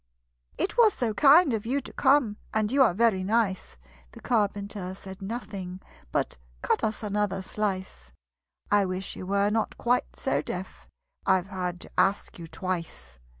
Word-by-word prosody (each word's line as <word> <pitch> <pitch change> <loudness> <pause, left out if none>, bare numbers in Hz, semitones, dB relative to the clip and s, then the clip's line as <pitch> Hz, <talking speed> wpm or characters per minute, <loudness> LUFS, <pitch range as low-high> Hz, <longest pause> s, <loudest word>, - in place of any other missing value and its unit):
"It 400 - -1
was 445 -3 +6
so 235 -4 -1
kind 285 - +6
of 220 0 -2
you 270 +4 +1
to - - -11
come, 265 -6 +3 0.2
And 215 0 +1
you 275 +1 +3
are 225 -9 +5
very 220 -4 +3
nice!" 200 - 0 0.4
The - - -11
Carpenter 205 -4 -1
said 190 0 -10
nothing 195 -4 -5 0.3
but - - -1 0.2
"Cut - - +1
us 220 0 -1
another 205 -2 -1
slice: 185 - -4 0.6
I 205 -1 +5
wish 185 0 -3
you 185 - -7
were 200 +1 +2
not 220 -1 -1
quite 245 +1 0
so - - 0
deaf - - -7 0.4
I've 190 -1 +3
had 180 -2 -3
to - - -10
ask 195 -1 +1
you 165 - -7
twice!" 160 - -5
200 Hz, 160 wpm, -27 LUFS, 185-225 Hz, 0.6 s, was